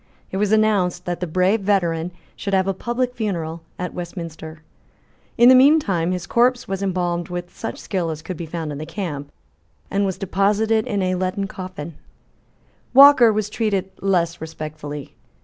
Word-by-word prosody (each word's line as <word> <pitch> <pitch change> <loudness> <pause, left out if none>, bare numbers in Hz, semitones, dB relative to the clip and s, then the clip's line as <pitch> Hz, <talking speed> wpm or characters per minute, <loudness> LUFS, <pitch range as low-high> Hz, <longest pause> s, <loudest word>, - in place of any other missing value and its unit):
It 190 - -3
was 205 +1 +1
announced 200 -5 +2
that 175 -1 -3
the 180 - -3
brave 185 +6 +2
veteran 175 -4 0 0.2
should 200 -1 -2
have 190 0 +2
a 195 - +1
public 240 +5 -2
funeral 170 -8 -3 0.2
at 180 -1 -4
Westminster. 165 -3 -7 0.7
In 240 - +7
the 255 - +9
mean 280 +5 +7
time 180 - -1
his 180 -1 -3
corpse 245 +4 +2
was 195 0 -3
embalmed 175 -3 -1
with 175 0 -6
such 225 - -5
skill 180 -4 -2
as 155 -1 -5
could 185 - -5
be 170 0 -6
found 160 -1 -4
in 145 - -6
the 155 - -6
camp, 160 -6 -5 0.6
and 200 +1 +1
was 190 -2 -1
deposited 210 +4 +1
in 205 -5 -1
a 185 0 +1
leaden 185 +2 -1
coffin, 185 -5 -8 1.0
Walker 275 -4 +9
was 215 -1 -1
treated 205 -3 -1
less 170 -4 0
respectfully. 155 -2 -7
185 Hz, 170 wpm, -21 LUFS, 170-210 Hz, 1.0 s, the